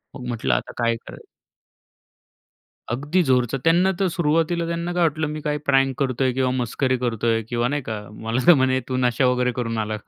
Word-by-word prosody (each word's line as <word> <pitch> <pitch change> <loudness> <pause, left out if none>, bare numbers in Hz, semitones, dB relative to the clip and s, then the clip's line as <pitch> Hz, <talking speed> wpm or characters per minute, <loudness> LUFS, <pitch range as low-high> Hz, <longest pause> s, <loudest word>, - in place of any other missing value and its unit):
मग 125 -3 -7
म्हटलं, 110 - -1
आता 65 - -3
काय 115 0 +2
करायचं? - - -11 1.6
अगदी 145 +9 0
जोरचा. 130 -2 +1
त्यांना 175 +3 +4
तर 195 - +2
सुरुवातीला 165 +1 +1
त्यांना 170 +1 -3
काय 175 -1 +1
वाटलं, 155 -1 0
मी 155 +1 -5
काय 150 0 -1
प्रँक 135 -1 +3
करतोय 130 -1 +1
किंवा 130 0 +1
मस्करी 130 +1 0
करतोय 115 -2 0
किंवा 120 0 0
नाही 145 +2 -1
का. 110 -4 -5
मला 110 +4 -3
तर 175 - +10
म्हणे, 130 -2 +2
"तू 130 - -1
नशा 125 +1 +2
वगैरे 125 0 +2
करून 115 -2 -2
आला 110 0 -2
का?" 105 - -18
130 Hz, 190 wpm, -22 LUFS, 120-150 Hz, 1.6 s, तर